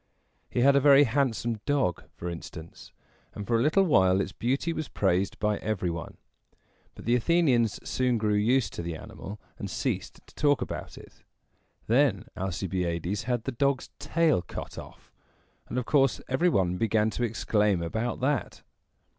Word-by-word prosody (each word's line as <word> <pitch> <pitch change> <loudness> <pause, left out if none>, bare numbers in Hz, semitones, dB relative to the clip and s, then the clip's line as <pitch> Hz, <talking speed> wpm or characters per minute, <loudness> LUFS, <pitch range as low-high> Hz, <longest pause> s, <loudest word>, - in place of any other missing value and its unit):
He 120 - 0
had 140 +2 +5
a - - +6
very 140 0 +7
handsome 120 -3 0
dog, 135 - 0
for 85 - -6
instance; 85 -1 -8 0.4
and 105 - -5
for 115 +1 +2
a - - +2
little 155 +9 +4
while 95 - +4
its 95 - -2
beauty 135 +10 -1
was 155 -2 -4
praised 95 0 0
by 105 -1 0
every 95 -5 -1
one. 85 -2 -7 0.8
But - - -11
the 120 - +2
Athenians 125 -5 +2
soon 125 -2 +1
grew 105 -1 0
used 110 0 +2
to - - -4
the 85 -1 -4
animal, 100 +6 -9 0.2
and - - -4
ceased - - -3
to - - -20
talk 145 -2 +2
about - - -6
it. - - -15 0.6
Then 120 -3 +2
Alcibiades 90 +1 -2
had 120 -2 -1
the - - -3
dog's 140 +2 0
tail 165 - +2
cut - - -8
off, - - -13 0.6
and 120 - -3
of 125 - -1
course 135 -2 +3
every 165 +8 +2
one 90 - +1
began 110 +1 +1
to 120 - -3
exclaim 105 -5 +1
about 110 +9 -3
that. 140 +2 -1
115 Hz, 165 wpm, -28 LUFS, 95-135 Hz, 0.8 s, very